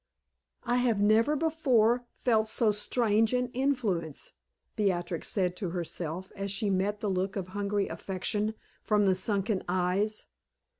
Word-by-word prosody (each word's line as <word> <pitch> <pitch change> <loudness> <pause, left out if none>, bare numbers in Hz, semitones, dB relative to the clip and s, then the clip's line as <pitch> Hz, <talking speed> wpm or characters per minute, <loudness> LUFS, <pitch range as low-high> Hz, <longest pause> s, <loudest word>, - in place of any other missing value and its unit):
"I 245 0 +1
have 240 -4 +2
never 220 +8 +4
before 255 -7 +2
felt 220 -3 +2
so 220 0 +3
strange 220 +1 +2
an 250 0 +1
influence," 235 - -1 0.4
Beatrix 175 -5 -1
said 180 -3 0
to 190 -5 -3
herself, 175 +1 -4
as 195 0 -3
she 200 +1 0
met 200 +2 0
the 210 - -1
look 190 0 -1
of 185 -3 -4
hungry 205 +1 -1
affection 205 +3 -2 0.3
from 210 -1 +2
the 190 - +4
sunken 195 +1 -1
eyes. 185 +4 0
205 Hz, 140 wpm, -29 LUFS, 190-225 Hz, 0.4 s, never